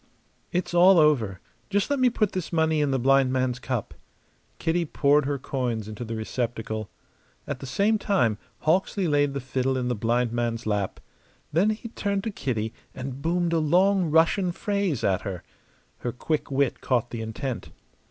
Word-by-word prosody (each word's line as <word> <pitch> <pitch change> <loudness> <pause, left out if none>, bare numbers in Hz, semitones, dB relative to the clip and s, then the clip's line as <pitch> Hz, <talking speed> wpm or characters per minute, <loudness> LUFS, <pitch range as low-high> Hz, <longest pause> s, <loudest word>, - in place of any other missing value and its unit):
"It's 180 0 -1
all 180 +2 +7
over. 125 - +3 0.3
Just 205 +5 0
let 285 - +1
me 255 -1 +5
put 215 -4 0
this 185 -3 -4
money 160 -2 +2
in 145 - +2
the 135 - +1
blind 135 +1 +4
man's 130 -1 0
cup." 125 -3 -3 0.6
Kitty 170 +1 0
poured 145 -2 +2
her 145 -1 0
coins 125 -5 -3
into 110 +2 -6
the 115 -1 -5
receptacle. 110 -1 -3 0.6
At 140 -3 -4
the 135 - -7
same 205 +10 +2
time 120 - +1 0.2
Hawksley 185 +3 +1
laid 145 -2 +2
the - - -1
fiddle 130 0 -1
in 125 -1 -1
the - - +1
blind 115 +2 +1
man's 120 0 -2
lap. 105 -3 -1 0.5
Then 180 +7 +4
he 215 +2 -3
turned 200 -3 -2
to 225 - -2
Kitty 115 - -2 0.2
and 130 0 -6
boomed 170 +1 0
a 165 - +3
long 180 +3 +3
Russian 165 +4 +3
phrase 200 - -1
at 95 -2 +2
her. 95 -4 -5 0.6
Her 120 - -3
quick 150 +5 -2
wit 140 -2 0
caught 120 -2 0
the 115 - -4
intent. 110 +2 -4
140 Hz, 175 wpm, -26 LUFS, 120-175 Hz, 0.6 s, all